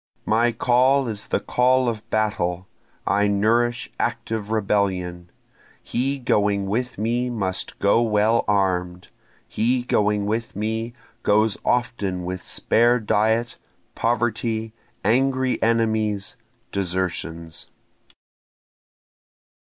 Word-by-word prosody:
My 115 +2 +3
call 125 +3 +3
is 105 -3 -4
the - - 0
call 125 +4 +2
of 110 -2 -4
battle, 95 -4 -1 0.4
I 100 +1 +2
nourish 115 +4 +1
active 110 -2 -2
rebellion, 95 -5 -1 0.5
He 135 +4 -1
going 105 -5 +1
with 120 +6 -2
me 120 +4 0
must 95 -6 -2
go 100 +3 +3
well 110 0 +2
arm'd, 90 -3 0 0.4
He 120 +3 0
going 105 -3 +1
with 110 +1 -2
me 110 +3 -2 0.3
goes 110 -1 +3
often 100 -7 -1
with 90 0 -4
spare 120 +2 +2
diet, 110 +2 0 0.3
poverty, 115 -1 -1 0.3
angry 130 +3 +2
enemies, 110 -4 0 0.4
desertions. 85 -3 -3
110 Hz, 100 wpm, -23 LUFS, 100-120 Hz, 0.5 s, My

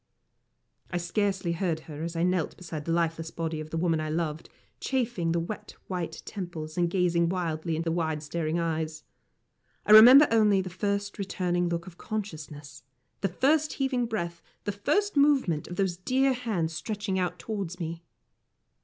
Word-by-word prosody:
I 175 - -2
scarcely 190 +1 0
heard 170 -2 -1
her 155 -1 -9
as 170 +1 -4
I 165 - 0
knelt 180 -3 0
beside 160 -4 -6
the 165 - -1
lifeless 165 -1 0
body 165 -1 -3
of 155 0 -6
the 165 - -3
woman 165 -2 +1
I 155 - -3
loved, 160 -1 -2 0.3
chafing 240 -10 -1
the 170 - +1
wet 210 +5 -6
white 175 -3 -4
temples, 170 -5 -6
and 175 -1 +1
gazing 170 -2 +2
wildly 165 -2 -2
into 160 - -2
the - - -1
wide 160 -3 -1
staring 155 +1 -2
eyes. 160 -2 -2 0.8
I - - +2
remember 250 +7 +10
only 210 -3 +4
the 185 -1 -4
first 200 +2 -2
returning 180 -2 0
look 170 0 -2
of 175 -2 -12
consciousness, 155 -9 -6 0.4
the 195 - +1
first 295 - +2
heaving 260 -3 0
breath, 170 -7 -3 0.2
the 205 - -1
first 400 - 0
movement 270 - +3
of 175 - -6
those 185 -2 0
dear 260 +8 +2
hands 210 -10 -2
stretching 205 +2 -2
out 180 -1 -1
towards 195 -5 -5
me. 165 0 -5
175 Hz, 170 wpm, -28 LUFS, 165-205 Hz, 0.8 s, remember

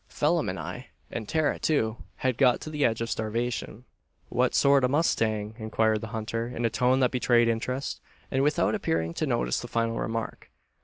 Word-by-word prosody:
Phelim - - +1
and - - -4
I, - - -6 0.2
and 110 -2 -5
Tara, 155 -2 +1
too, 115 -8 +1 0.2
had 130 -2 -1
got 125 -3 +5
to 155 - -6
the 150 -2 -1
edge 115 -2 +2
of 115 - -2
starvation." 115 +2 -3 0.4
"Whet 125 +1 +1
sort 140 -1 +5
o' - - +5
a - - -6
mustang?" 110 -8 +1
inquired 110 0 +1
the 115 - -5
hunter, 115 +1 -3
in 120 -1 -3
a 115 - +1
tone 130 +1 +2
that 125 - +3
betrayed 120 -2 +3
interest, 125 +4 -2 0.3
and 135 - +1
without 150 +2 +2
appearing 80 0 -1
to - - -2
notice - - 0
the - - -6
final 115 0 -1
remark. 115 0 -4
115 Hz, 195 wpm, -27 LUFS, 110-130 Hz, 0.4 s, got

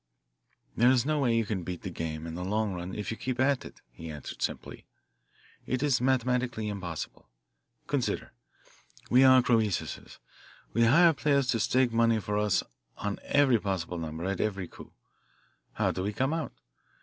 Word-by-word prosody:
"There 120 +2 +5
is 130 -1 +3
no 155 0 +1
way 120 -4 +2
you 115 - +1
can 100 -3 -2
beat 90 0 -6
the 95 - -4
game 80 -1 -4
in 80 - -6
the 90 +2 -5
long 105 +1 0
run 90 +1 -5
if 105 0 -4
you 115 - -4
keep 130 -1 -3
at 135 0 +2
it," - - -12
he 80 +6 -9
answered 75 -2 -8
simply. - - -4 0.8
"It 130 +2 -1
is 135 -4 +2
mathematically 125 -3 0
impossible. 85 -10 -6 0.6
Consider. - - -2 0.8
We 125 +2 +7
are 130 -1 +7
Croesuses 110 -6 -1 0.6
we 115 +1 +4
hire 165 +8 +6
players 140 -1 +2
to 115 - +2
stake 125 +1 +2
money 115 -1 +3
for 105 +1 -2
us 105 -3 +2 0.3
on 100 0 -3
every 140 -5 +3
possible 90 -4 -3
number 80 +1 -5
at 95 -1 -1
every 100 -4 -2
coup. - - -13 0.8
How - - +1
do 95 - -4
we 100 +3 -2
come 135 +7 0
out? 160 -3 -3
110 Hz, 175 wpm, -29 LUFS, 95-130 Hz, 0.8 s, We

